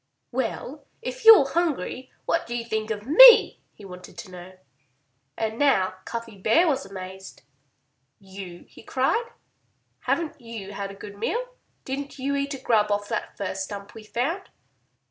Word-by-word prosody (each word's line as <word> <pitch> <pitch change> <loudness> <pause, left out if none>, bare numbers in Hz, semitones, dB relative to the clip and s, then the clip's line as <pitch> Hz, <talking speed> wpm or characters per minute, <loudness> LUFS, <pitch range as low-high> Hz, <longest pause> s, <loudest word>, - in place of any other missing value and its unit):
"Well, - - -4 0.2
if - - -6
you're 430 -11 +9
hungry, 275 - -2
what 335 +1 0
do 240 - -4
you 230 - -4
think 220 -1 -3
of 210 -1 -4
me?" 465 - +8
he 205 - -15
wanted 180 -1 -12
to 190 - -9
know. 180 +1 -11 0.8
And 220 0 -3
now 195 -11 +3
Cuffy 230 -3 -7
Bear 270 - +3
was 270 -9 0
amazed. 190 0 -10 0.8
"You!" 190 -2 -10
he - - -16
cried. 270 - 0 0.7
"Haven't 325 -4 -2
you 225 -4 -8
had 200 0 -5
a 195 - -10
good 200 0 -11
meal? - - -2 0.3
Didn't 275 +2 -5
you 280 +1 -1
eat 280 0 -2
a - - -9
grub 215 -4 +2
off 205 0 -1
that - - -4
first 190 -1 -3
stump 200 0 -9
we 225 - -11
found?" 280 - -3
225 Hz, 160 wpm, -25 LUFS, 195-280 Hz, 0.8 s, you're